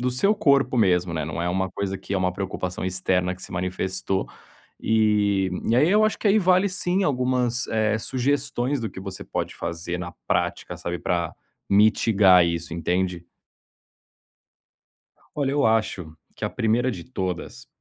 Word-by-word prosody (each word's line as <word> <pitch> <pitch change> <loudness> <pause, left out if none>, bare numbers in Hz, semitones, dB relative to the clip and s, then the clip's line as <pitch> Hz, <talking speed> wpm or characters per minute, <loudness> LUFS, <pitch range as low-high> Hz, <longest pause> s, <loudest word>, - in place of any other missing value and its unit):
do 125 +1 0
seu 195 +12 +3
corpo 140 -10 +2
mesmo, 90 -5 +2
né, 80 -2 -2
não 80 +2 -4
é 90 - 0
uma 95 +1 0
coisa 95 -1 -3
que 100 - -5
é - - +2
uma 90 -1 0
preocupação 95 -1 -4
externa 90 0 0
que 95 - -15
se - - -9
manifestou. 95 +1 -2 0.5
Eh, 105 -3 +2 0.2
e - - +3
aí 150 +5 +4
eu 215 +1 +5
acho 215 - +1
que 210 - +1
aí 210 - +5
vale 185 0 +3
sim, 185 +1 0
algumas, 125 -2 +1
eh, 110 -1 +1
sugestões 135 +1 -1
do 110 - -3
que 95 - -9
você 95 -1 -7
pode - - -4
fazer 85 +1 -4
na 90 -1 -6 0.2
prática, - - -1
sabe, 85 0 -4
para 85 -2 -1 0.3
mitigar 100 -3 +5
isso, 85 0 -3
entende? 90 +1 -1 2.1
Olha, 140 -2 0
eu 145 -1 +2
acho 105 -7 0 0.2
que - - -3
a - - -2
1º 120 +3 +1
de 90 -5 -7
todas, 95 -8 -5
100 Hz, 165 wpm, -24 LUFS, 90-130 Hz, 2.1 s, eu